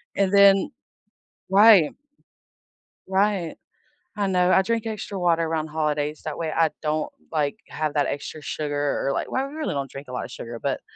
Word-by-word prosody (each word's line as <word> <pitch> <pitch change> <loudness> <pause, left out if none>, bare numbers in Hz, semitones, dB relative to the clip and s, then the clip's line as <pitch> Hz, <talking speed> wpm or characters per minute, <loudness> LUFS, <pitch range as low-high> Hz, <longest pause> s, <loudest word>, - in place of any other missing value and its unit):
And 195 -1 +1
then 200 -1 +6 0.8
Right. 200 -5 +7 1.2
Right. 190 -3 0 0.6
I 200 - +1
know, 180 -1 +2
I 190 - +5
drink 230 +2 -1
extra 210 -2 -5
water 170 -2 +2
around 160 -1 -2
holidays, 150 -1 -2
that 155 - -5
way 165 -2 -2
I 160 0 +2
don't, 155 0 -1 0.2
like, 150 -3 -1
have 155 -1 -2
that 145 -1 +2
extra 145 +2 -5
sugar 145 -2 -2
or, - - +1
like - - -3
well, 260 - 0
I - - -2
really 305 - -4
don't 140 -2 -3
drink 135 0 -10
a - - -8
lotta 125 - -4
sugar, 115 0 -8
but - - -1
160 Hz, 175 wpm, -24 LUFS, 150-195 Hz, 1.2 s, Right